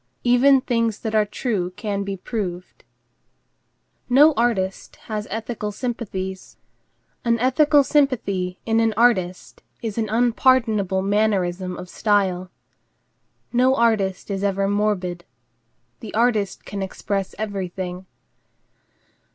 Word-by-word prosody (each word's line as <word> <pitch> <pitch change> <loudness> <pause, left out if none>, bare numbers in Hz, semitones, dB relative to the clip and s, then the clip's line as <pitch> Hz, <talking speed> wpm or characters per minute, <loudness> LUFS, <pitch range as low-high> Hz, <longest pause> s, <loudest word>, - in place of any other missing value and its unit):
Even 255 +2 +5
things 230 -4 0
that 220 -1 -3
are 215 -1 +3
true 205 -5 -2
can 200 -3 -2
be 195 0 -4
proved. 185 -3 -5 1.3
No 290 +5 +6
artist 220 -7 -1
has 215 -1 -4
ethical 220 -1 -4
sympathies. 195 -5 -5 0.7
An 235 -1 +2
ethical 285 +4 +4
sympathy 205 -11 0
in 225 0 +2
an 225 -1 +1
artist 185 -7 +1 0.2
is 225 -1 -3
an 220 -2 -1
unpardonable 225 -4 +2
mannerism 190 -3 0
of 180 - -8
style. 185 -3 0 1.0
No 255 +2 +4
artist 215 -6 +1
is 195 0 -2
ever 195 0 +1
morbid. 195 -4 -1 0.8
The 220 - -8
artist 220 -4 +1
can 200 -1 -5
express 195 0 -3
everything. 185 -3 -5
210 Hz, 110 wpm, -22 LUFS, 190-235 Hz, 1.3 s, No